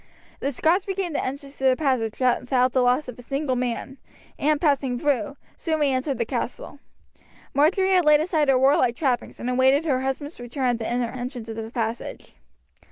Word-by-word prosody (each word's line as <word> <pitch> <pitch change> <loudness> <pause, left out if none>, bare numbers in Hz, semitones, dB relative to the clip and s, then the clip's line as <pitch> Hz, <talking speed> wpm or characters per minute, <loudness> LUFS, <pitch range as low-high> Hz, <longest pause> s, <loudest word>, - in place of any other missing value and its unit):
The 280 - -1
Scots 340 +9 +1
regained 385 -3 -2
the - - -1
entrance 275 +1 -6
to - - -7
the 260 -1 +5
passage 255 -7 -1
without 255 0 +2
the 260 - +3
loss 250 +4 +2
of 250 -1 -8
a - - -8
single 275 +1 -2
man, 250 +2 -3 0.4
and 300 +1 +2
passing 275 -5 +1
through, 275 -2 0 0.2
soon 320 -2 -2
re 290 -2 +2
entered 265 +1 -1
the 235 - 0
castle. 250 +3 -5 0.7
Marjory 375 +7 +3
had 365 -3 +4
laid 300 -1 +6
aside 315 -2 +1
her 265 - +5
warlike 255 -2 +3
trappings 255 -3 -1
and 240 - -4
awaited 260 +4 +3
her 260 -5 +1
husband's 270 +3 -4
return 245 +2 -2
at 240 -1 0
the 225 - -3
inner 240 -1 -1
entrance 245 -2 -6
of 225 - -5
the 225 0 -5
passage. 230 0 -4
265 Hz, 195 wpm, -24 LUFS, 245-295 Hz, 0.7 s, laid